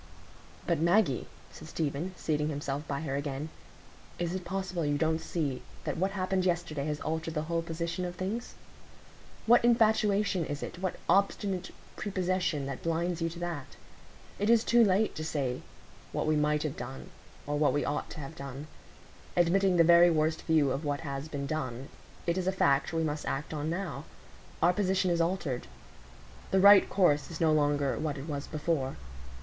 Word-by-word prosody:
"But, 170 Hz, -3 st, +1 dB
Maggie," 170 Hz, -, +2 dB, 0.2 s
said -, -, -11 dB
Stephen, 160 Hz, +4 st, -3 dB
seating 150 Hz, -1 st, 0 dB
himself 145 Hz, 0 st, -3 dB
by 140 Hz, 0 st, -2 dB
her 140 Hz, -4 st, -3 dB
again, 140 Hz, +1 st, -3 dB, 0.7 s
"is 175 Hz, 0 st, -2 dB
it 185 Hz, -1 st, -3 dB
possible 185 Hz, -1 st, -3 dB
you 145 Hz, -1 st, +1 dB
don't 160 Hz, +1 st, +1 dB
see 145 Hz, -7 st, -2 dB, 0.2 s
that -, -, -2 dB
what 190 Hz, +4 st, +1 dB
happened 185 Hz, -1 st, 0 dB
yesterday 170 Hz, -5 st, -1 dB
has 150 Hz, -1 st, -2 dB
altered 160 Hz, +1 st, -3 dB
the 150 Hz, -, 0 dB
whole 165 Hz, +1 st, -1 dB
position 170 Hz, +2 st, -3 dB
of 175 Hz, 0 st, -4 dB
things? 200 Hz, +7 st, -4 dB, 0.9 s
What 235 Hz, +2 st, +6 dB
infatuation 215 Hz, -5 st, +3 dB
is 145 Hz, -1 st, -4 dB
it, -, -, -6 dB
what 185 Hz, -1 st, -2 dB
obstinate 195 Hz, -1 st, +1 dB, 0.3 s
prepossession, 185 Hz, -6 st, -1 dB
that 135 Hz, -1 st, -5 dB
blinds 170 Hz, +1 st, -1 dB
you 165 Hz, -, +1 dB
to 170 Hz, -, -9 dB
that? 170 Hz, -6 st, -5 dB, 0.6 s
It 205 Hz, +2 st, +1 dB
is 230 Hz, -1 st, +5 dB
too 235 Hz, -1 st, +5 dB
late 205 Hz, +1 st, +2 dB
to 155 Hz, -, -5 dB
say 140 Hz, -5 st, -2 dB, 0.5 s
what -, -, -1 dB
we 155 Hz, 0 st, +2 dB
might 150 Hz, 0 st, +2 dB
have 150 Hz, -3 st, -3 dB
done 130 Hz, +2 st, -7 dB, 0.3 s
or 145 Hz, 0 st, -1 dB
what 150 Hz, -, +4 dB
we 145 Hz, -, 0 dB
ought 145 Hz, -, -2 dB
to -, -, -8 dB
have 140 Hz, +3 st, -8 dB
done. 140 Hz, 0 st, -7 dB, 0.7 s
Admitting 180 Hz, +2 st, +3 dB
the 170 Hz, -, +7 dB
very 170 Hz, +1 st, +7 dB
worst 155 Hz, -1 st, +1 dB
view 155 Hz, -4 st, +3 dB
of 135 Hz, +4 st, -2 dB
what 145 Hz, -1 st, -1 dB
has 140 Hz, -1 st, -4 dB
been 145 Hz, -3 st, -4 dB
done, 135 Hz, -4 st, -4 dB, 0.4 s
it 170 Hz, +2 st, +1 dB
is 185 Hz, -, -2 dB
a -, -, +4 dB
fact 140 Hz, -7 st, +2 dB
we 165 Hz, 0 st, 0 dB
must 150 Hz, -1 st, -3 dB
act 140 Hz, +4 st, -3 dB
on 150 Hz, 0 st, -2 dB
now; 165 Hz, -5 st, -4 dB, 0.6 s
our 175 Hz, +2 st, +5 dB
position 190 Hz, -1 st, +1 dB
is 170 Hz, -1 st, +2 dB
altered; 165 Hz, -7 st, -1 dB, 0.8 s
the 190 Hz, -, +3 dB
right 200 Hz, +1 st, +8 dB
course 150 Hz, -7 st, +3 dB
is 165 Hz, -, -7 dB
no 160 Hz, -2 st, +4 dB
longer 145 Hz, -2 st, +1 dB
what 150 Hz, -2 st, -2 dB
it 135 Hz, +3 st, -7 dB
was 145 Hz, -2 st, -4 dB
before. 150 Hz, -4 st, -1 dB
160 Hz, 180 wpm, -30 LUFS, 145-185 Hz, 0.9 s, right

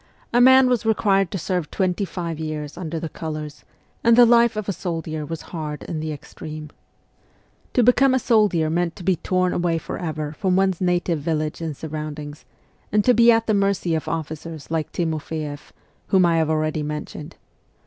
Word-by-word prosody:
A 240 Hz, -, +5 dB
man 260 Hz, +1 st, +7 dB
was 245 Hz, -2 st, +1 dB
required 200 Hz, -4 st, +2 dB
to 195 Hz, -, -3 dB
serve 180 Hz, -2 st, -2 dB
twenty 190 Hz, 0 st, 0 dB
five 170 Hz, -4 st, -5 dB
years 155 Hz, -2 st, -5 dB
under 165 Hz, -2 st, -4 dB
the 165 Hz, -, -4 dB
colours, 155 Hz, -2 st, -6 dB, 0.4 s
and 230 Hz, 0 st, +6 dB
the 245 Hz, -, +9 dB
life 235 Hz, -1 st, +5 dB
of 215 Hz, -2 st, -4 dB
a 200 Hz, -, 0 dB
soldier 165 Hz, -3 st, -4 dB
was 165 Hz, -1 st, -6 dB
hard 150 Hz, -3 st, -5 dB
in 160 Hz, -, -4 dB
the 155 Hz, 0 st, -3 dB
extreme. 150 Hz, +1 st, -8 dB, 1.0 s
To 245 Hz, -, +4 dB
become 260 Hz, +2 st, +5 dB
a -, -, +4 dB
soldier 210 Hz, -10 st, +2 dB
meant 170 Hz, 0 st, 0 dB
to -, -, -10 dB
be 185 Hz, -1 st, +2 dB
torn 185 Hz, +1 st, 0 dB
away 170 Hz, -1 st, 0 dB
for -, -, -6 dB
ever 155 Hz, -3 st, -3 dB
from 185 Hz, +3 st, 0 dB
one's 190 Hz, -2 st, +1 dB
native 175 Hz, -2 st, +1 dB
village 155 Hz, +1 st, -2 dB
and 160 Hz, -4 st, -4 dB
surroundings, 150 Hz, -1 st, -6 dB, 0.5 s
and 210 Hz, 0 st, +2 dB
to 250 Hz, -, +6 dB
be 235 Hz, 0 st, +6 dB
at 225 Hz, 0 st, +2 dB
the 215 Hz, -, +1 dB
mercy 195 Hz, -4 st, +1 dB
of 160 Hz, -, -2 dB
officers 160 Hz, -1 st, -5 dB
like 160 Hz, -2 st, -1 dB
Timofeeff, 155 Hz, -3 st, -4 dB, 0.4 s
whom 190 Hz, -2 st, +4 dB
I 170 Hz, -1 st, +3 dB
have 160 Hz, -1 st, +1 dB
already 155 Hz, 0 st, 0 dB
mentioned. 150 Hz, 0 st, -6 dB
165 Hz, 185 wpm, -22 LUFS, 155-195 Hz, 1.0 s, the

